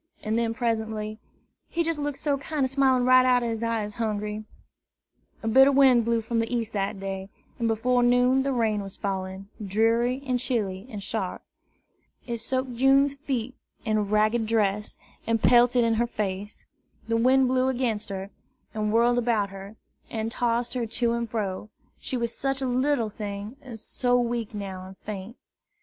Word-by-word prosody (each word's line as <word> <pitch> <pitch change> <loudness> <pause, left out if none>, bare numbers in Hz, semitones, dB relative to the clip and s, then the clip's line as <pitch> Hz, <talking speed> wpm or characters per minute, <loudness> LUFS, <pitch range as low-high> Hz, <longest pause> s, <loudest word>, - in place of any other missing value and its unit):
and 215 +1 -1
then 230 -1 +1
presently, 220 -2 -2 0.5
"He 340 - 0
jes' 330 -2 -1
look 290 -1 -2
so 285 0 0
kinder 285 -1 -1
smilin' 260 -2 +3
right 255 0 +7
out 250 -1 +3
ob 235 - -1
his 225 -1 -3
eyes, 225 -3 -1
Hungry!" 210 -1 -2 1.0
A - - -2
bitter 265 +5 +6
wind 260 -4 +5
blew 230 -1 +1
from 230 +1 -1
the 225 +1 -1
east 230 -2 -2
that 200 0 -2
day, 195 0 -5 0.3
and 230 - +1
before 245 +3 +2
noon 245 +2 +4
the 275 +1 0
rain 220 -4 +1
was 195 -1 -8
falling, 190 0 -4
dreary 230 +6 +1
and 255 -2 0
chilly 210 -5 -2
and 210 -5 -7
sharp. - - -3 0.8
It 235 -2 -4
soaked 260 0 -2
June's 275 +2 +4
feet 260 -4 -3 0.3
and 215 -2 0
ragged 215 +2 +2
dress, 210 -2 0 0.3
and 230 0 +2
pelted 245 +1 +5
in 230 0 +2
her 235 +2 +1
face. 205 -2 -4 0.4
The 230 - +1
wind 260 +3 +4
blew 255 0 +2
against 240 -5 -1
her, 195 0 -5 0.4
and 210 -1 -1
whirled 240 +2 +4
about 225 -5 +1
her, 195 +2 -9 0.3
and 225 0 -3
tossed 240 0 0
her 245 -3 -2
to 230 +1 0
and 235 -1 -2
fro, 210 -2 -3 0.3
she 255 - -3
was 235 -1 -2
such 270 -1 -1
a 270 - -2
little 250 -2 +1
thing, 205 +2 -6
and 250 -5 -9
so 245 +3 0
weak 235 -2 -2
now 190 -2 -6
and 190 0 -12
faint. 210 +2 -7
230 Hz, 175 wpm, -26 LUFS, 210-250 Hz, 1.0 s, right